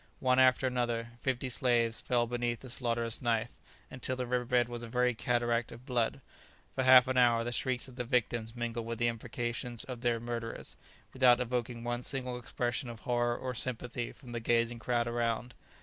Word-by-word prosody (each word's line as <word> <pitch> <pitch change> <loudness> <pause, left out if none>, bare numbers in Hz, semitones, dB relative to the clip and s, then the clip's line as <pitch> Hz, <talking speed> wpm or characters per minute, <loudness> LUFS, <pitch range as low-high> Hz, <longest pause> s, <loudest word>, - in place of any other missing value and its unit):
One 130 0 +3
after 130 0 +5
another, 120 -2 -1
fifty 130 0 -1
slaves 120 -2 +2
fell 120 -1 +2
beneath 120 0 -2
the 130 - -8
slaughterous 115 -2 -1
knife, 115 -3 +1 0.4
until 130 0 -3
the 125 0 -2
river 125 0 0
bed 120 -1 +3
was 120 -1 -6
a 120 - -6
very 125 +1 +2
cataract 120 0 0
of 120 +2 -11
blood. 120 -4 0 0.5
For - - 0
half 130 0 +8
an 130 0 0
hour 120 -2 +5
the 120 - -3
shrieks 125 +1 0
of 130 -1 -13
the 125 - -1
victims 120 -2 0
mingled 120 -1 -3
with 115 0 -3
the 120 +1 +2
imprecations 120 0 -3
of 125 -3 -7
their 120 -1 +1
murderers, 115 -1 -4 0.4
without 125 -2 +5
evoking 120 -1 -2
one 120 0 -2
single 125 -1 -3
expression 120 +1 -2
of 115 -1 -9
horror 120 -1 +1
or 130 -1 -4
sympathy 120 0 -3
from 125 -4 -13
the 120 - -3
gazing 115 0 +1
crowd 120 0 0
around. 120 +1 -1
120 Hz, 190 wpm, -32 LUFS, 115-125 Hz, 0.5 s, half